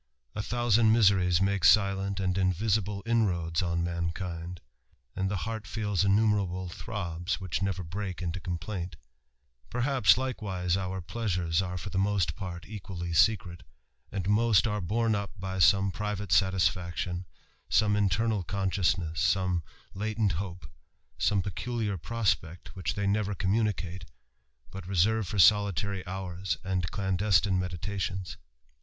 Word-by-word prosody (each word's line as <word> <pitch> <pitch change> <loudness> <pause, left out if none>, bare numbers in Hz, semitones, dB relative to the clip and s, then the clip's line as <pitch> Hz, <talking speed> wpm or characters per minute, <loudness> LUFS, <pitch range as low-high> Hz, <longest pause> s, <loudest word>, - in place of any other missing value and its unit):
A 105 - -2
thousand 120 -1 +3
miseries 95 -5 +4
make 100 -2 0
silent 100 -1 +4
and 95 -1 0
invisible 100 +2 0
inroads 90 -8 +1
on 85 -1 0
mankind, 85 0 -4 0.6
and 95 0 -1
the 100 - -1
heart 110 -2 -5
feels 105 -5 0
innumer 105 +1 +3
able 90 0 -5
throbs, 90 -2 -4
which 95 -2 -3
never 95 -1 -1
break 95 +2 -5
into 90 +1 -3
complaint 90 0 -4 0.7
Perhaps, 125 -6 +3
likewise, 100 -9 -1
our 95 0 -3
pleasures 90 -4 -1
are 90 -1 -4
for 100 +2 -6
the 95 - 0
most 100 -2 +1
part 90 -4 -6
equally 90 -5 -6
secret, 90 -1 +2 0.5
and 95 -2 -3
most 110 +1 +4
are 105 -2 -1
borne 110 +5 +1
up 100 0 -4
by 95 0 -4
some 95 +1 +5
private 105 0 -4
satisfaction, 90 0 +1 0.4
some 105 -1 +3
iatemal 105 -1 +1
consciousness, 90 -5 0
some 90 +1 +2 0.3
latent 105 0 0
hope, 90 -1 -5 0.5
some 100 -2 +2
peculiar 110 +2 -2
prospect, 90 -4 -2
which 95 - -3
they 100 - -1
never 100 0 0
communicate, 95 -3 -1 0.7
but 95 -2 -8
reserve 100 +3 +2
for 105 - -4
solitary 100 -1 +4
hours 90 -2 -3
and 90 -2 -1
clandestine 95 -1 +2
meditations. 95 +1 -3
95 Hz, 130 wpm, -29 LUFS, 90-105 Hz, 0.7 s, some